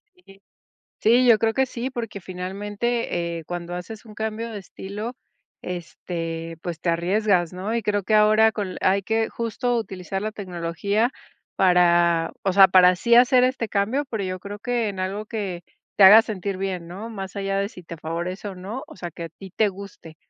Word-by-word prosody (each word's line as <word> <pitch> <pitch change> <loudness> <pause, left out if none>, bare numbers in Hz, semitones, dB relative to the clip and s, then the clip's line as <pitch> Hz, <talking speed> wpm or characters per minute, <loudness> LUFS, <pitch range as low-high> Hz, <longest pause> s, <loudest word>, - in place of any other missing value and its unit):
Sí. 195 - -19 0.6
Sí, 240 +3 +4
yo 230 -3 +7
creo 225 0 +1
que 265 +3 +1
sí, 250 +1 -4
porque 230 -5 -5
finalmente, 190 0 -3
eh, 165 - -9
cuando 175 +1 -5
haces 215 +6 -7
un 215 -2 -13
cambio 220 +2 -4
de 210 - -5
estilo, 205 +5 -7 0.5
este, 165 -2 -5
pues, 170 -2 -5
te 170 - +1
arriesgas, 180 +1 +1
¿no? 195 +5 -3
Y 235 - 0
creo 205 -1 0
que 215 - +1
ahora, 215 +1 +5
con 200 -4 -4
la - - -7
hay 195 +1 +3
que 225 +2 0
justo, 235 +1 -2
utilizar 195 -3 -4
la 215 - -2
tecnología 200 +4 -1 0.5
para, 175 -2 +4
o 195 - +2
sea, 195 0 +8
para 185 0 +6
sí 235 +6 +2
hacer 250 +1 +6
este 255 -3 0
cambio, 220 +9 0
pero, 220 -3 -2
yo 185 -1 -3
creo, 200 +2 -8
que 240 -1 -1
en 195 -2 -5
algo 195 +3 -3
que 195 -6 -4 0.3
te 200 - +7
haga 210 +4 +10
sentir 200 -3 -4
bien, 185 -3 -3
¿no? 195 +7 -7
Más 195 -4 -7
allá, 195 0 -1
de 200 0 0
si 180 - -12
te 170 0 -9
favorece 170 +5 -4
o 195 - -7
no. 200 +8 -6
O - - -14
sea, 175 -2 -6
que 170 +1 -8
a - - -6
ti 190 +4 -13
te 215 -2 +3
guste. 190 -4 -11
195 Hz, 200 wpm, -23 LUFS, 180-220 Hz, 0.6 s, haga